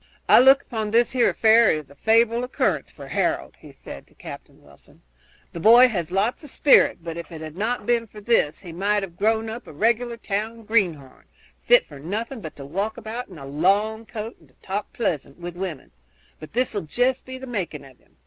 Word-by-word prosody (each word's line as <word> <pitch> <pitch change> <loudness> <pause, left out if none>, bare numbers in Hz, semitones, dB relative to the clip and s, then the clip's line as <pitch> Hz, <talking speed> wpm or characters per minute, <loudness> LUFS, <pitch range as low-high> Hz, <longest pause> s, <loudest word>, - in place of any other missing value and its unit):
"I - - +8
look 270 +2 +6
upon 220 -2 -4
this 235 +2 +3
here 255 -2 +3
affair 225 0 +5
as 145 -3 -10
a - - -16
favorable 230 +6 +2
occurrence 250 - -1
for - - -11
Harold," - - -1
he - - -14
said 70 - -11
to - - -27
Captain - - -11
Wilson. 70 -1 -21 0.5
"The 170 - -6
boy 235 +7 +7
has 175 -7 -3
lots 205 - 0
of 295 - -10
spirits, 275 -9 +4
but 165 -1 -6
if 170 - -8
it 160 - -8
had 155 0 -8
not 215 +3 -2
been 235 0 +1
for 210 - -12
this 210 -8 +1
he 175 -4 -10
might 200 +3 0
have 175 -3 -8
grown 220 +3 +1
up 230 +3 -7
a - - -9
regular 235 +7 0
town 225 +1 -4
greenhorn, 175 - -1 0.4
fit - - +5
for - - -12
nothing 220 - -5
but 155 - -8
to 140 - -9
walk 200 - -3
about 235 +2 -6
in 180 - -13
a 140 - -9
long 200 +10 0
coat 225 0 -7
and 160 -5 -23
to 130 - -29
talk 200 +2 -4
pleasant 150 - -3
to 175 0 -6
women; 175 -4 -6 0.5
but 155 - -11
this 250 +1 0
'll 205 - -2
jest 245 - 0
be 260 0 -8
the 260 - -8
making 185 - -4
of 130 -2 -17
him. - - -32
210 Hz, 215 wpm, -23 LUFS, 170-235 Hz, 0.5 s, I